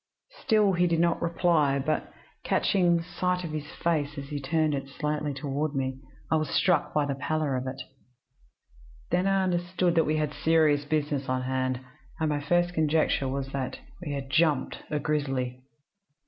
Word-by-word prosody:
"Still 210 -3 +3
he 180 0 +3
did 165 -1 +1
not 170 0 +2
reply; 165 -5 +2
but, 150 +3 -1 0.3
catching 175 -3 +2
a - - -7
sight 180 +1 -1
of 165 - -4
his 150 -1 -4
face 150 -4 -1
as 140 0 -6
he 145 -1 -4
turned 155 +2 +1
it 135 -1 -3
slightly 150 +1 -2
toward 140 +2 -2
me, 130 -1 -2 0.3
I 160 - +4
was 155 -1 -1
struck 175 -5 +2
by 150 -1 +1
the 140 - -1
pallor 150 0 -1
of 130 +1 -3
it. 130 +1 -5 1.3
Then 180 +2 +2
I 195 -1 +3
understood 175 0 0
that 165 -2 +3
we 155 - +2
had 150 -1 -1
serious 155 -3 +3
business 145 -2 -1
on 130 0 0
hand, 130 0 -1 0.4
and 160 -1 +1
my 145 -1 0
first 175 +4 +1
conjecture 155 -3 +2
was 135 0 -3
that 135 -2 -3 0.3
we 150 - -4
had 135 -1 -5
'jumped' 155 -3 +2
a 150 - 0
grizzly. 135 -4 -1
150 Hz, 175 wpm, -28 LUFS, 140-170 Hz, 1.3 s, I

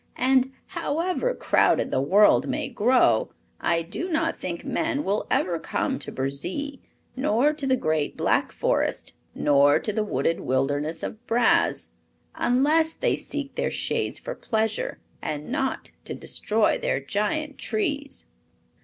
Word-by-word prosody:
And, 260 +1 +3
however 365 +11 -1
crowded - - +2
the 130 - +1
world 200 +9 +5
may 290 +2 -2
grow, 235 - +3 0.3
I 165 -1 +1
do 320 - -4
not 325 0 0
think 170 -2 -5
men 305 -3 -1
will 205 -2 -1
ever 170 -2 +1
come 265 +10 -2
to - - -6
Burzee, 175 - -3 0.3
nor 265 +2 +2
to 295 -3 -3
the 260 - +4
Great 155 - -1
Black - - +1
Forest, - - -1 0.2
nor 145 0 +4
to 210 - -3
the 215 - 0
wooded 165 -5 0
wilderness 145 +5 -1
of 215 - -5
Braz; 235 0 +2 0.4
unless 305 +6 +2
they - - +1
seek 285 -1 -5
their - - -1
shades - - -1
for - - -5
pleasure 225 - -1 0.2
and 150 +6 -4
not 270 -1 -2
to - - -5
destroy 215 +1 0
their - - 0
giant 210 - -2
trees." 280 +6 -2
240 Hz, 140 wpm, -25 LUFS, -, 0.4 s, world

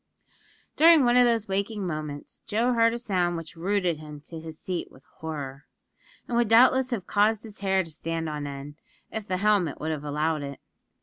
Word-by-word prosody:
During 320 -3 +7
one 240 0 +4
of 250 0 +7
those 230 -2 +1
waking 200 +1 -2
moments, 155 -3 -5
Joe 235 +4 +1
heard 230 -1 +4
a 235 - -3
sound 180 -7 0
which 165 -1 -8
rooted 180 -1 0
him 150 -1 -9
to 165 +2 -9
his 160 -1 -9
seat 180 -2 -4
with 130 - -18 0.2
horror; 145 -4 -6 0.6
and 240 - -2
would 235 -1 +3
doubtless 255 +3 +5
have 230 -7 -3
caused 210 +1 +2
his 215 -2 -9
hair 190 -1 +2
to 165 - -9
stand 165 +1 -3
on 150 -1 -4
end, 140 +1 -8 0.3
if 220 -2 -5
the 185 - -1
helmet 200 -6 +2
would 160 +1 -2
have 150 -2 -4
allowed 150 +1 -1
it. 140 -1 -6
180 Hz, 195 wpm, -26 LUFS, 155-220 Hz, 0.6 s, During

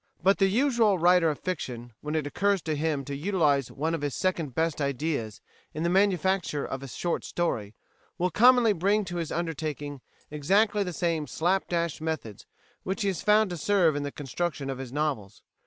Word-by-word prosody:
But 195 +2 +4
the 195 - +5
usual 230 -2 +3
writer 175 -1 +4
of 150 - -2
fiction, 125 -10 -5
when 150 +1 -3
it 155 -2 0
occurs 195 +4 0
to 155 -1 -1
him 150 -2 -1
to 140 - -5
utilise 150 -5 +1
one 160 +4 -2
of 165 - -2
his 145 -2 -2
second 165 -8 -1
best 160 -2 0
ideas 140 -5 -2 0.3
in 155 - -2
the 170 - +1
manufacture 190 -5 +1
of 135 - -5
a 135 - -7
short 170 +7 -2
story, 115 -12 -2 0.4
will 180 +1 0
commonly 245 +1 +5
bring 200 +4 +1
to 175 -1 -5
his 165 -2 -3
undertaking 155 -4 -4 0.3
exactly 200 +8 +2
the 185 -2 -1
same 165 -3 -1
slap 180 +8 0
dash 170 -3 -1
methods 155 -10 -5 0.3
which 195 +3 -3
he 200 - +2
has 185 -5 -3
found 210 -1 +4
to 175 - -4
serve 175 -2 +3
in 145 - -1
the 145 0 -4
construction 145 0 -3
of 130 - -6
his 130 -2 -7
novels. 135 -9 -3
165 Hz, 190 wpm, -27 LUFS, 145-190 Hz, 0.4 s, the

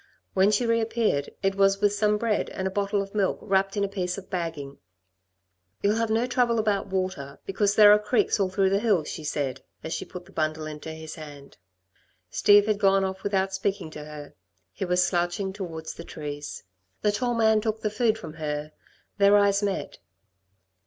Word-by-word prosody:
When 190 +1 +4
she 215 +3 +2
reappeared, 225 -9 +1
it 195 0 +2
was 195 0 +3
with 205 0 +3
some 210 0 +2
bread 220 -1 0
and 190 - -4
a - - -3
bottle 200 +1 0
of 195 - -12
milk 200 -3 +1
wrapped 195 0 0
in 200 - +1
a - - +1
piece 185 -2 -3
of 195 - -10
bagging. 160 -6 -4 1.0
"You'll 205 +2 +3
have 230 -1 0
no 225 +2 +2
trouble 245 -2 +1
about 210 -2 0
water, 185 -8 -3
because 200 +1 +1
there 210 -1 +8
are 210 - +7
creeks 215 +1 +1
all 195 -2 +2
through 190 0 +1
the 200 - +3
hills," 205 -8 +1
she 155 - -6
said, 145 -3 -2 0.2
as 160 - -4
she - - -3
put 180 -1 -10
the 195 - -17
bundle 155 -1 -2
into 155 +1 -7
his 160 0 -8
hand. 145 -3 -11 0.7
Steve 205 0 +5
had 210 -1 0
gone 195 -1 +4
off 190 0 -4
without 195 -1 0
speaking 190 -4 -2
to 150 - -8
her. 150 -1 -10 0.4
He 190 - -3
was 180 0 +2
slouching 175 +2 -1
towards 165 -5 -6
the - - -9
trees. 145 -1 -7 0.4
The 210 - +3
tall 240 +3 -1
man 220 -1 +4
took 220 0 -2
the 215 - -1
food 220 0 +1
from 165 -8 -9
her. 150 -1 -4 0.5
Their 200 +1 +6
eyes 200 0 +3
met. 200 -2 -3
195 Hz, 195 wpm, -26 LUFS, 165-210 Hz, 1.0 s, there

